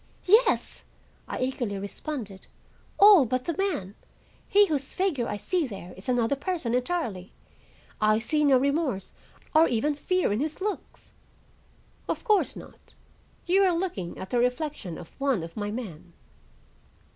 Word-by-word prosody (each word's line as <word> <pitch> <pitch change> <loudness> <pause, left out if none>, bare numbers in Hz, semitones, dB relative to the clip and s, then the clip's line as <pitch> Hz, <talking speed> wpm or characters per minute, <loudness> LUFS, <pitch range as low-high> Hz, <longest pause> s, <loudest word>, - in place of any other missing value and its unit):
"Yes," 435 +6 +3 0.4
I - - -4
eagerly 245 -5 -2
responded. 200 0 -6 0.5
"All 400 -6 +8
but 255 +2 -1
the 335 - -2
man. 350 - -2 0.6
He 410 +1 +6
whose 285 -7 -2
figure 335 -11 0
I 210 - -3
see 315 - -1
there 190 -5 -9
is 190 +6 -8
another 245 +1 +2
person 300 -5 -3
entirely; 245 - -2 0.7
I 215 0 +4
see 300 +7 0
no 275 -3 +5
remorse, 275 - -1 0.4
or 320 +2 +6
even 265 +6 +1
fear, 365 - 0
in 210 - 0
his 305 +2 -3
looks." 410 +1 -5 1.0
"Of - - -2
course 425 -5 +2
not. - - -14 0.5
You 370 +3 +3
are 370 -3 +3
looking 270 - -4
at 190 - -8
the 245 - +2
reflection 250 - -2
of 170 - -11
one 270 -10 +1
of 165 0 -9
my 205 -1 -3
men. 185 -7 -7
260 Hz, 145 wpm, -27 LUFS, 210-335 Hz, 1.0 s, All